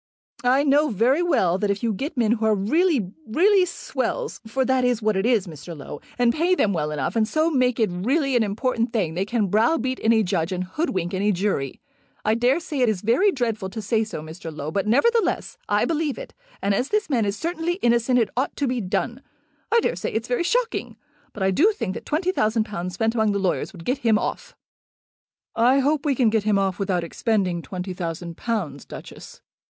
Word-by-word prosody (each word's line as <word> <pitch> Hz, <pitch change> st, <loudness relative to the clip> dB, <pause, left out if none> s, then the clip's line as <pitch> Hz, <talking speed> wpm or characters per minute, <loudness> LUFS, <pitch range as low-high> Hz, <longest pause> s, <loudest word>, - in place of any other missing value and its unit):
"I 260 Hz, +3 st, +4 dB
know 295 Hz, +1 st, +3 dB
very 245 Hz, -, +2 dB
well 190 Hz, -, +2 dB
that 205 Hz, -, 0 dB
if 200 Hz, +2 st, -1 dB
you 230 Hz, -2 st, +1 dB
get 280 Hz, -, -5 dB
men 225 Hz, -3 st, +2 dB
who 225 Hz, -1 st, +1 dB
are 215 Hz, -, +4 dB
really, 235 Hz, -, +1 dB, 0.2 s
really 370 Hz, -, +4 dB
swells, 465 Hz, +6 st, -3 dB
for 260 Hz, +4 st, 0 dB
that 260 Hz, -1 st, +2 dB
is 245 Hz, -2 st, +2 dB
what 215 Hz, -2 st, +1 dB
it 195 Hz, +4 st, +1 dB
is, 230 Hz, -6 st, +2 dB
Mr. 165 Hz, 0 st, -9 dB
Low, 145 Hz, +1 st, -8 dB, 0.2 s
and 240 Hz, -1 st, +3 dB
pay 345 Hz, +4 st, +2 dB
them 205 Hz, -, +2 dB
well 150 Hz, -3 st, -1 dB
enough, 150 Hz, -, -2 dB
and 220 Hz, -1 st, +2 dB
so 315 Hz, +7 st, +1 dB
make 255 Hz, -4 st, +2 dB
it 215 Hz, -5 st, +2 dB
really 265 Hz, -, 0 dB
an 240 Hz, -, +4 dB
important 230 Hz, +3 st, -1 dB
thing, 185 Hz, -9 st, 0 dB
they 185 Hz, +3 st, -1 dB
can 225 Hz, 0 st, 0 dB
browbeat 245 Hz, -, +1 dB
any 225 Hz, -1 st, +4 dB
judge 180 Hz, -2 st, -1 dB
and 185 Hz, 0 st, -2 dB
hoodwink 185 Hz, -, -2 dB
any 200 Hz, +2 st, +1 dB
jury. 180 Hz, -8 st, -1 dB, 0.5 s
I 215 Hz, -, +3 dB
daresay 265 Hz, +6 st, 0 dB
it 250 Hz, -3 st, +4 dB
is 200 Hz, -4 st, -1 dB
very 260 Hz, -, +3 dB
dreadful 225 Hz, -, -2 dB
to 220 Hz, -, -6 dB
say 220 Hz, +1 st, +1 dB
so, 210 Hz, -8 st, -6 dB
Mr. 165 Hz, +1 st, -8 dB
Low; 150 Hz, 0 st, -5 dB
but, 195 Hz, +3 st, -1 dB
nevertheless, 460 Hz, -, +1 dB
I -, -, +3 dB
believe 315 Hz, -3 st, -1 dB
it, -, -, -9 dB, 0.3 s
and 200 Hz, 0 st, +2 dB
as 250 Hz, +7 st, 0 dB
this 425 Hz, 0 st, 0 dB
man 250 Hz, -6 st, +1 dB
is 200 Hz, 0 st, -1 dB
certainly 335 Hz, +3 st, -2 dB
innocent 240 Hz, -, +2 dB
it 225 Hz, -4 st, +1 dB
ought 260 Hz, +3 st, -1 dB
to 285 Hz, -, -1 dB
be 250 Hz, -1 st, -1 dB
done. 235 Hz, +6 st, -2 dB, 0.5 s
I 465 Hz, +1 st, +5 dB
daresay -, -, -2 dB
it's 225 Hz, +2 st, -2 dB
very 245 Hz, +4 st, 0 dB
shocking, 480 Hz, +6 st, -1 dB, 0.3 s
but 205 Hz, -, -5 dB
I 190 Hz, -, +3 dB
do 345 Hz, -, +4 dB
think 215 Hz, -, -3 dB
that -, -, -8 dB
twenty 345 Hz, +5 st, 0 dB
thousand 220 Hz, -, +1 dB
pounds 180 Hz, -4 st, -5 dB
spent 225 Hz, +3 st, +1 dB
among 220 Hz, -3 st, +2 dB
the -, -, 0 dB
lawyers 190 Hz, -3 st, -1 dB
would 170 Hz, -5 st, -12 dB
get 260 Hz, +2 st, 0 dB
him 225 Hz, -5 st, +3 dB
off." -, -, -4 dB, 1.0 s
"I 245 Hz, +4 st, +4 dB
hope 290 Hz, +2 st, +1 dB
we 280 Hz, -, +2 dB
can 235 Hz, -4 st, +3 dB
get 220 Hz, -1 st, +2 dB
him 210 Hz, 0 st, +2 dB
off 195 Hz, -1 st, 0 dB
without 185 Hz, -3 st, 0 dB
expending 185 Hz, -1 st, -1 dB
twenty 185 Hz, +1 st, -5 dB
thousand 170 Hz, -1 st, -5 dB
pounds, 175 Hz, -, -3 dB
Duchess." -, -, -11 dB
225 Hz, 215 wpm, -23 LUFS, 195-270 Hz, 1.0 s, I